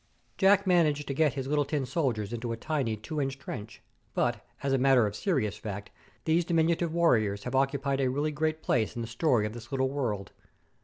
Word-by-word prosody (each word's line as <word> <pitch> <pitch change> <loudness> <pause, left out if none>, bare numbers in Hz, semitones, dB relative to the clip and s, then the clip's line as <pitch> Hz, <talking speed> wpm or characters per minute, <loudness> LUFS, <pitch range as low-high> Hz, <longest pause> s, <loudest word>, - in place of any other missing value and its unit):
Jack 200 0 +4
managed 155 -6 +3
to 140 - -3
get 145 -2 +2
his 135 -2 -3
little 145 +1 +2
tin 140 -1 -2
soldiers 125 - -1
into 120 0 -3
a 115 - -3
tiny 135 -5 -1
two 145 +8 -4
inch 135 0 -2
trench; 115 -4 -8 0.3
but, - - 0 0.2
as 140 -1 +1
a 135 - +3
matter 130 -3 +5
of 105 0 -3
serious 110 - 0
fact, 105 -1 -6 0.3
those 165 +2 +3
diminutive 165 0 +1
warriors 110 -12 +2
have 125 - -5
occupied 135 0 +1
a 130 - +2
really 145 +4 0
great 155 +1 -1
place 110 -4 +1
in 120 - -3
the - - -5
story 120 -1 +2
of 105 - -4
this 120 0 -10
little 130 -1 +1
world. 115 -9 -2
135 Hz, 205 wpm, -29 LUFS, 115-155 Hz, 0.3 s, matter